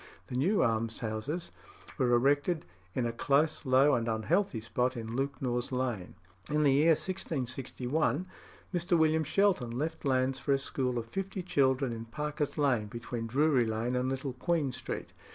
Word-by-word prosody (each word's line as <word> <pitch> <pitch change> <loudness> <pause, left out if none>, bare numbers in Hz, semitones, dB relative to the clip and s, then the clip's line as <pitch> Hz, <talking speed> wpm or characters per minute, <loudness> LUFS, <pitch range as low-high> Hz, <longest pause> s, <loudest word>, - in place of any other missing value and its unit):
The - - -4
new 180 +11 +3
almshouses 115 - -2 0.5
were 125 - +3
erected 145 +7 +2 0.3
in 125 - +1
a 115 - 0
close, 145 +5 +1
low, 135 +3 +5
and 115 -2 +1
unhealthy 115 - +1
spot 125 +3 -1
in 115 0 -5
Lewknor's 130 -2 -2
Lane. 125 -8 -2 0.3
In 150 0 +2
the 140 -2 +5
year 155 +4 +5
1661 140 -1 -2 0.5
Mr. 175 0 +2
William 160 0 +3
Shelton 185 -8 +2
left 155 +7 -3
lands 130 -1 +1
for 140 - +1
a - - +4
school 130 -1 -2
for 120 -1 -2
fifty 195 - -4
children 135 -6 +2
in 115 0 -6
Parker's 150 +3 -3
Lane, 130 -8 +2
between 115 +1 -5
Drury 135 -1 +3
Lane 115 +3 -1
and 125 +1 0
Little 135 0 -3
Queen 150 +1 0
Street. - - -6
135 Hz, 155 wpm, -31 LUFS, 120-150 Hz, 0.5 s, low